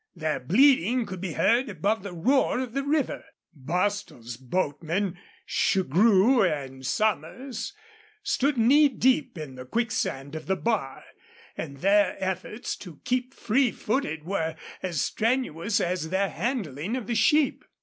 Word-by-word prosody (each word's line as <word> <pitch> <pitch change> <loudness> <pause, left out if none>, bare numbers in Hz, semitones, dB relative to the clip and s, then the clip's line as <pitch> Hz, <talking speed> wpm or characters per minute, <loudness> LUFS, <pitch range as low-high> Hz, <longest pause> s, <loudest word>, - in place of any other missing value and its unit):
Their 155 -2 -1
bleating 245 - +4
could 185 -3 -7
be 185 -4 -3
heard 235 - +2
above 205 +4 0
the 200 0 -7
roar 250 +13 +2
of 255 -3 -4
the 275 - 0
river. 285 0 -1 0.3
Bostil's 170 - -2
boatmen, 170 - -2 0.3
Shugrue 200 - +3
and 135 -6 -2
Somers, 220 - -2 0.5
stood 290 -9 +1
knee 280 +6 +5
deep 260 - +1
in 150 -4 -7
the 130 0 -9
quicksand 140 - -2
of 160 0 -7
the 190 - +2
bar, 200 -11 -2 0.5
and 140 -3 -6
their 205 +1 +4
efforts 190 +4 -3
to 170 -6 -11
keep 255 +1 -1
free 245 +3 +2
footed 215 - -2
were 165 -3 -2 0.3
as 175 -5 -2
strenuous 225 -5 0
as 175 -2 -1
their 190 +2 +1
handling 210 - -3
of 245 - -5
the 235 - -2
sheep. 265 +7 +3
200 Hz, 140 wpm, -26 LUFS, 160-245 Hz, 0.5 s, knee